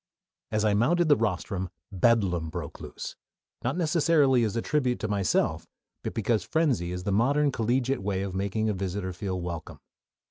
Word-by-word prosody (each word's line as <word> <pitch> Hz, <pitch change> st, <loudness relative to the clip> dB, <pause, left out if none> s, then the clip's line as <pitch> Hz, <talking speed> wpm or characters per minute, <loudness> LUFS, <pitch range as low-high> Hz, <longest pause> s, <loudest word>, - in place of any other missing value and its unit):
As 110 Hz, 0 st, +1 dB
I 105 Hz, -, +3 dB
mounted 155 Hz, +11 st, +3 dB
the 145 Hz, -, +7 dB
rostrum 95 Hz, -4 st, -2 dB, 0.2 s
bedlam 95 Hz, -5 st, +2 dB
broke -, -, -6 dB
loose: -, -, -7 dB, 0.5 s
not 130 Hz, +7 st, -1 dB
necessarily 155 Hz, -6 st, +3 dB
as 110 Hz, -1 st, -1 dB
a 115 Hz, -, 0 dB
tribute 130 Hz, -5 st, +1 dB
to -, -, -1 dB
myself, 100 Hz, -2 st, 0 dB, 0.4 s
but -, -, -4 dB
because 110 Hz, -2 st, +1 dB
frenzy 130 Hz, -, +1 dB
is 90 Hz, 0 st, -4 dB
the 100 Hz, -, -1 dB
modern 140 Hz, +8 st, +3 dB
collegiate 125 Hz, +2 st, 0 dB
way 95 Hz, -1 st, -1 dB
of 100 Hz, -2 st, -4 dB
making 100 Hz, +3 st, -1 dB
a 105 Hz, -, +1 dB
visitor 95 Hz, 0 st, -3 dB
feel 95 Hz, 0 st, -3 dB
welcome. 85 Hz, -2 st, -6 dB
110 Hz, 170 wpm, -27 LUFS, 95-130 Hz, 0.5 s, the